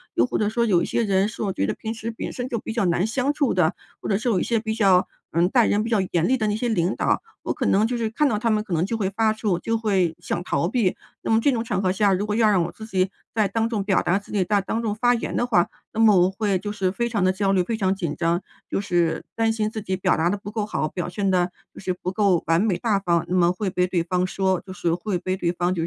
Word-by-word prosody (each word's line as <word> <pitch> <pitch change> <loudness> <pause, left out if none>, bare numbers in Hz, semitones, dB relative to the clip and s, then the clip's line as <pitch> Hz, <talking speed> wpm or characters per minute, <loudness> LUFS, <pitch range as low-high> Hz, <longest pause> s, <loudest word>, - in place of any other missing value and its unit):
又 120 - +4
或 - - -2
者 210 -1 +1
说 235 +1 +1
有 185 -6 +3
一 - - 0
些 235 - 0
人 195 +1 +2
是 220 - -8
我 200 -3 -1
觉 100 - 0
得 110 - -1
平 220 +1 -5
时 225 +1 -5
本 225 - -6
身 250 +1 -4
就 230 - -2
比 225 - -6
较 230 - 0
难 175 +2 +1
相 255 +4 0
处 290 -4 +1
的， 175 -1 +2 0.3
或 - - -5
者 195 - +2
是 220 - -4
有 200 -7 +2
一 - - +1
些 230 -2 +1
比 220 0 -3
较， 195 -5 +4 0.2
嗯， 170 +2 +3
待 240 -1 +4
人 210 +1 +1
比 - - -3
较 220 -4 +2
严 170 -1 +2
厉 260 - +3
的 220 -4 -1
那 210 - 0
些 240 +2 -1
领 185 -4 +1
导。 - - +1 0.2
我 - - -1
可 - - -3
能 210 +3 +3
就 245 - -2
是 225 -2 -1
看 290 +7 +1
到 215 -6 0
他 230 +1 0
们 215 -1 +2
可 205 -5 -6
能 165 +2 +1
就 225 +3 -2
会 195 -4 0
发 220 +2 +1
怵， 215 -4 -1
就 225 +5 -1
会 195 -7 +1
想 175 - -3
逃 165 0 0
避。 210 -3 0 0.2
那 - - -2
么 225 - +5
这 280 - +2
种 230 -2 -1
场 200 -5 -1
合 185 - +1
下， 200 0 +3
如 195 +2 0
果 210 - -1
要 220 -1 +4
让 190 -4 +3
我 170 - -3
自 220 - -9
己 190 -3 0 0.2
再 215 -2 +2
当 225 +2 -1
众 220 -4 -1
表 195 -2 +2
达 175 +3 +1
自 200 - -13
己、 195 -3 +2
再 205 +2 +2
当 220 +4 -2
众 215 -3 -1
发 245 +3 +2
言 235 - -4
的 245 - 0
话， 180 -8 +3 0.3
那 220 - -4
么 220 -2 +7
我 180 +1 +4
会 195 -1 -1
就 205 +2 -5
是 190 -3 0
非 235 +5 -1
常 220 -5 -1
地 185 - +4
焦 195 0 0
虑、 185 -2 +3
非 225 +5 -3
常 190 -2 +1
紧 170 -6 -3
张， 170 +1 +1 0.3
就 - - -1
是 175 -4 0
担 225 0 +1
心 215 -1 -1
自 220 -1 -5
己 190 -2 -2
表 185 -2 +1
达 165 +2 +2
得 200 - 0
不 205 0 -8
够 215 -1 -2
好， 155 -7 -2
表 175 +1 -4
现 195 -2 -1
得 180 -1 +2 0.2
就 - - -12
是 185 -1 -2
不 180 0 -4
够 195 -4 +2
完 165 +3 +3
美、 210 -5 +1
大 215 -5 +1
方， 170 -4 +1
那 180 - 0
么 175 0 +4
会 190 +2 -2
被 180 0 +1
对 175 -2 0
方 180 +1 0
说。 190 -1 0
就 185 - -8
是 170 -2 -1
会 180 +1 -2
被 185 +1 -2
对 175 -2 0
方 175 +1 0
就 165 - -2
200 Hz, 330 characters per minute, -23 LUFS, 180-220 Hz, 0.3 s, 么